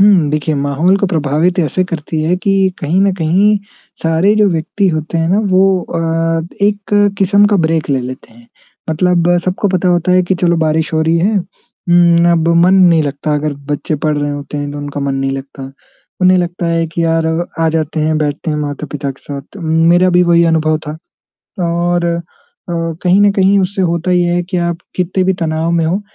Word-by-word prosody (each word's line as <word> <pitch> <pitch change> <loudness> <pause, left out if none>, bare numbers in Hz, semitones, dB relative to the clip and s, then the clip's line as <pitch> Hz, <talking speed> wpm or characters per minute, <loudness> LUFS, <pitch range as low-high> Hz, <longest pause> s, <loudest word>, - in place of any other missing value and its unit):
हुँ, 195 -6 +4
देखिए 155 +1 -1
माहौल 145 +6 +1
को 200 - 0
प्रभावित 160 +1 0
ऐसे 175 +2 +1
करती 160 -2 -4
है 170 +3 +1
कि 195 +2 0 0.2
कहीं 160 +5 0
न 195 -1 +2
कहीं 190 +5 +2 0.5
सारे 165 +6 +2
जो 210 - +4
व्यक्ति 180 +4 -1
होते 160 0 -2
हैं 165 - 0
ना 190 +4 +2
वो 185 +1 +4 0.2
अ, 165 0 -1 0.2
एक 205 0 +1
किस्म 200 +1 +3
का 205 - +4
ब्रेक 160 -1 -1
ले 135 -2 +1
लेते 125 -1 -8
हैं। 115 +1 -19 0.4
मतलब 175 +1 +2
सबको 190 +2 -1
पता 185 -1 0
होता 175 +1 +1
है 185 - +4
कि 180 +1 -1
चलो 170 -1 +3
बारिश 160 0 0
हो 160 - +1
रही 160 +1 +1
है। 205 +5 +1
हुँ, 175 -2 +1
अब 165 -1 +1 0.2
मन 190 - +4
नहीं 175 -4 +4
लगता 145 +1 -2
अगर 150 0 -1 0.2
बच्चे 145 +2 -2
पढ़ 155 -1 +1
रहे 145 0 -2
होते 145 +1 -6
हैं 145 0 -4
तो 145 - -6
उनका 145 0 -6
मन 140 -1 -2
नहीं 135 0 -1
लगता। 135 0 -9 0.5
उन्हें 185 0 +4
लगता 175 0 -2
है 165 0 0
कि 165 +1 -3
यार 165 0 +1 0.3
आ 165 - +2
जाते 160 0 -2
हैं 155 +1 0
बैठते 150 +2 -2
हैं 150 - -1
माता-पिता 145 -1 -4
के 135 - -12
साथ। 140 -1 -6
तो 200 - -11
मेरा 165 +2 +3
भी 180 0 +4
वही 170 -1 +3
अनुभव 155 -1 +1
था। 150 - -5 0.7
और 170 +1 0
अ, 170 - 0 0.6
कहीं 170 +3 0
न 205 0 +5
कहीं 195 0 +3
उससे 190 +1 -1
होता 170 0 -1
ये 175 -1 +2
है 175 - 0
कि 185 - -1
आप 170 - -3 0.2
कितने 185 +1 0
भी 190 - +2
तनाव 160 +1 -1
में 170 -1 +1
हो 185 +5 -1
165 Hz, 205 wpm, -14 LUFS, 155-180 Hz, 0.7 s, न